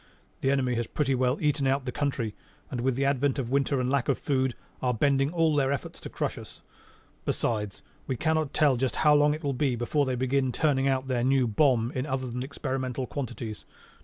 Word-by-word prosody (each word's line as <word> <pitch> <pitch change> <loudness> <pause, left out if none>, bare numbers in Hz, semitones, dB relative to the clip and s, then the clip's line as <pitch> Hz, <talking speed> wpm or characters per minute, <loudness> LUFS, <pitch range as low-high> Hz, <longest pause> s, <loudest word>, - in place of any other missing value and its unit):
"The 135 - +1
enemy 130 -2 +1
has 120 -1 -1
pretty 135 -3 0
well 130 +1 +1
eaten 145 -2 +1
out 135 0 +1
the 125 - -2
country 125 -6 -2 0.4
and 125 - -2
with 130 0 +1
the 135 +2 0
advent 140 0 +1
of 125 -3 -3
winter 140 0 +2
and 125 - 0
lack 135 0 +1
of 140 - +2
food, 130 -3 0 0.3
are 125 -2 +1
bending 135 +3 +2
all 165 -3 +2
their 135 -2 +2
efforts 140 - -4
to - - -8
crush - - -3
us. - - -13 0.6
Besides, 105 -4 -2 0.2
we 130 - -1
cannot 155 -1 +1
tell 145 -5 +3
just 130 +1 -1
how 150 - +7
long 145 0 +4
it 155 - -10
will 140 -1 0
be 130 -1 +1
before 135 +4 0
they 130 - 0
begin 130 +1 +1
turning 140 0 +1
out 135 -1 +1
their 125 -2 0
new 130 0 +3
bomb 120 0 +2
in 130 +3 -3
other 130 -1 -2
than 125 0 -4
experimental 130 -2 -3
quantities. 120 -6 -5
135 Hz, 215 wpm, -28 LUFS, 125-140 Hz, 0.6 s, how